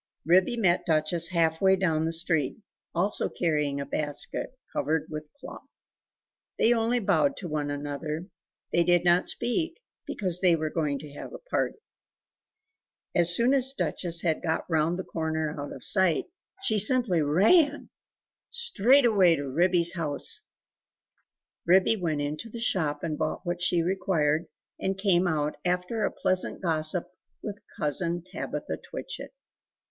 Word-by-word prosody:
Ribby 185 +8 +3
met 185 -6 +1
Duchess 160 +1 +1
half 165 -2 +1
way 190 0 +5
own 160 -3 +1
the 165 - -1
street, 160 -4 0 0.4
also 195 +5 +1
carrying 150 -4 -1
a 140 - -3
basket, 145 - -2 0.2
covered 155 0 0
with 155 0 -5
a 285 - -39
cloth. - - -11 0.9
They 235 - +4
only 230 +1 +1
bowed 245 +6 +1
to 185 - -6
one 150 -2 -2
another; 145 +3 -4 0.5
they 170 - +4
did 175 0 +3
not 175 +1 +4
speak, 325 - -2 0.3
because 180 -3 -2
they 180 -3 +5
were 155 -1 -3
going 150 -4 -1
to 145 0 -11
have 145 - -9
a - - -6
party. - - 0 1.4
As 175 0 +5
soon 240 +5 +4
as 265 -1 0
Duchess 170 -2 0
had 160 -3 0
got 160 -1 -2
round 165 +1 +1
the 185 - -4
corner 160 -2 -2
out 145 - -6
of 135 - -9
sight 190 -5 +2 0.4
she 220 - +2
simply 215 -5 +3
ran! 250 - +3 0.6
Straight 280 - +3
away 190 -7 +5
to 145 -2 -4
Ribby's 170 +4 +3
house! 155 -5 -2 1.3
Ribby 190 +5 +5
went 160 -7 -2
into 150 +9 -4
the 235 - -8
shop 155 -10 -1
and 155 -2 -3
bought - - -2
what 175 0 -3
she 175 -1 +2
required, 170 -4 0 0.3
and 190 0 -2
came 190 -2 +2
out, 150 -2 -1
after 180 +5 -1
a - - +1
pleasant 185 0 -1
gossip 165 0 0 0.4
with 205 -2 -6 0.2
Cousin 170 +2 +1
Tabitha 185 - -5
Twitchit. - - -7
175 Hz, 150 wpm, -27 LUFS, 155-195 Hz, 1.4 s, way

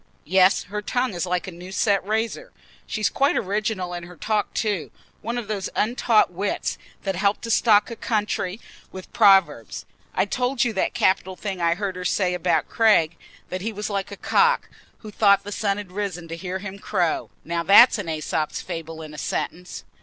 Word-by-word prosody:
Yes, 185 +2 +4
her 210 +3 -5
tongue 245 +2 -1
is 175 +1 -2
like 180 -1 -1
a 190 - -6
new 180 +2 -10
set 200 +1 +1
razor. 220 - -2 0.4
She's 215 -2 0
quite 275 +1 +1
original 200 -2 -2
in 175 - -4
her 180 +1 -12
talk 215 +5 -1
too; 205 -7 -1 0.3
one 235 +2 -3
of 235 -4 -4
those 205 -3 -3
untaught 220 -3 +2
wits 195 +3 -2 0.2
that 195 -1 -1
help 200 +3 +1
to 230 - -4
stock 220 0 +4
a - - -5
country 210 -3 -2 0.3
with 185 -1 -10
proverbs. 175 - +3 0.3
I 190 - +2
told 250 +4 0
you 240 -3 0
that 190 - -1
capital 190 0 +1
thing 190 -2 -5
I 170 0 +2
heard 195 -1 -3
her 180 - -6
say 180 0 +1
about 170 -4 +1
Craig—that 185 -3 0
he 225 +4 -2
was 210 0 -5
like 195 0 -2
a - - -8
cock, 475 +1 +2 0.3
who 215 - -9
thought 200 -1 +4
the 205 - -7
sun 200 -1 0
had 205 -3 -7
risen 185 -4 -4
to 165 - -4
hear 185 +2 -4
him 195 0 -8
crow. 180 -6 -1 0.2
Now 170 +1 -1
that's 205 +7 +7
an 195 - -5
Æsop's 155 -1 -2
fable 165 -2 -6
in 155 -1 -10
a 150 - -8
sentence." 180 +4 -4
195 Hz, 190 wpm, -23 LUFS, 180-215 Hz, 0.4 s, that's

